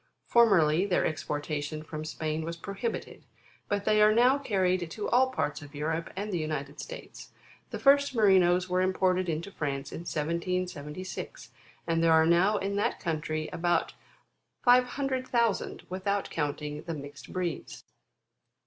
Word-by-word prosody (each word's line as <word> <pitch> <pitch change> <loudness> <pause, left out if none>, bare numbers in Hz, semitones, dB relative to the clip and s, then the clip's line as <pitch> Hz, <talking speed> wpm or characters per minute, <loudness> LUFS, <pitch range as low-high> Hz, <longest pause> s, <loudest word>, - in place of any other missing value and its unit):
Formerly, 190 -7 +4
their 185 - +2
exportation 150 0 -3
from 155 -1 -6
Spain 155 0 -3
was 165 +1 -5
prohibited; 200 +6 -5 0.4
but 205 -1 -1
they 215 0 +4
are 210 0 +7
now 250 +5 +4
carried 185 -8 0
to 210 +4 -4
all 260 +2 +4
parts 155 - -2
of 145 0 -12
Europe, 160 +3 -2
and 205 +1 -4
the 175 - 0
United 150 -2 -4
States. - - -9 0.4
The - - -4
first 280 -1 +4
Merinos 185 -4 +4
were 180 0 +1
imported 185 -1 +1
into 165 +5 -3
France 140 -5 -3
in - - -6
1776, 170 +1 -4 0.3
and 165 -1 +1
there 165 -1 +5
are 160 0 +6
now 180 +5 +4
in 200 +1 -2
that 205 - 0
country 155 -2 -2
about 175 0 0 0.7
500,000, 250 -2 +2
without 195 +2 -2
counting 150 -1 -3
the 165 -1 -5
mixed 145 0 -10
breeds. 180 -4 -4
180 Hz, 140 wpm, -29 LUFS, 155-205 Hz, 0.7 s, are